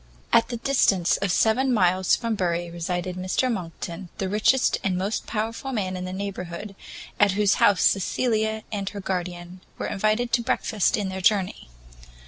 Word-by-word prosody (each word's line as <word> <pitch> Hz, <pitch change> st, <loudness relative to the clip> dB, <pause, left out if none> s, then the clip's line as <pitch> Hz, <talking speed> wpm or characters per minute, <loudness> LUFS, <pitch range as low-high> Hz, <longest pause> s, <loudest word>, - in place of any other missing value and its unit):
At 230 Hz, -, +5 dB
the 240 Hz, -, -3 dB
distance 220 Hz, -8 st, +2 dB
of 200 Hz, -2 st, -1 dB
seven 250 Hz, +8 st, +2 dB
miles 185 Hz, -4 st, +3 dB
from 230 Hz, -1 st, -2 dB
Bury 175 Hz, -3 st, -1 dB
resided 175 Hz, +1 st, -3 dB
Mr 185 Hz, +8 st, 0 dB
Monckton, 175 Hz, -2 st, -6 dB
the 195 Hz, -, -2 dB
richest 215 Hz, +6 st, +2 dB
and 185 Hz, -2 st, 0 dB
most 195 Hz, +4 st, -2 dB
powerful 225 Hz, +4 st, -3 dB
man 190 Hz, -6 st, -2 dB
in 180 Hz, 0 st, -4 dB
that 185 Hz, -, -5 dB
neighbourhood, 195 Hz, 0 st, -6 dB, 0.4 s
at 205 Hz, -2 st, +4 dB
whose 205 Hz, 0 st, +2 dB
house 205 Hz, -2 st, +5 dB
Cecilia 220 Hz, +2 st, +1 dB
and 200 Hz, -2 st, -2 dB
her 205 Hz, -, -7 dB
guardian 180 Hz, -1 st, -4 dB, 0.2 s
were -, -, -3 dB
invited 215 Hz, +4 st, 0 dB
to 245 Hz, -, +3 dB
breakfast 220 Hz, -3 st, +1 dB
in 200 Hz, -2 st, -2 dB
their 190 Hz, 0 st, -5 dB
journey. 190 Hz, -, +1 dB
195 Hz, 165 wpm, -25 LUFS, 180-220 Hz, 0.4 s, At